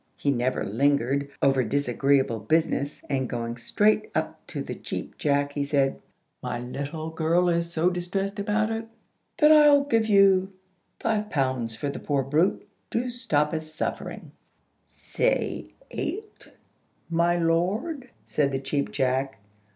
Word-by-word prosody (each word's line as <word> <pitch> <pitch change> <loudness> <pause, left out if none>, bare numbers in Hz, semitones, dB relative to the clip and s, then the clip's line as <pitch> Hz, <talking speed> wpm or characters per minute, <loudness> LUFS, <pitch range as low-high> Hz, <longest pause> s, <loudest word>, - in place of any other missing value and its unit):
He 140 - +1
never 130 0 0
lingered 140 +4 +1
over 135 -2 +4
disagreeable 135 0 +1
business, 145 +4 0
and, 130 -2 -1
going 115 -1 -3
straight 210 - +2
up - - -2
to - - -4
the - - -5
Cheap - - -6
Jack, 145 -1 +1
he 145 - -1
said, 140 -1 +1 0.4
"My 120 - -3
little 145 +6 -5
girl 165 +2 +2
is 170 0 0
so 170 +2 +2
distressed 195 +3 -3
about 215 +2 0
it, 225 0 -3 0.5
that 305 -2 +6
I'll 295 -2 +7
give 230 -5 +1
you 195 -2 +4 0.5
five 215 -2 -1
pounds 130 -5 -1
for 145 - -4
the 140 - -5
poor 140 -2 0
brute, 155 +8 +1 0.2
to 245 +2 -1
stop 150 -11 0
its 155 -1 -3
sufferings." 155 +1 -5 0.6
"Say - - -1 0.2
eight, 425 +2 -5 0.6
my 170 +1 +2
lord," 200 - 0 0.2
said 140 -2 0
the 135 - 0
Cheap 135 -4 -2
Jack. 130 +1 0
155 Hz, 140 wpm, -26 LUFS, 135-200 Hz, 0.6 s, I'll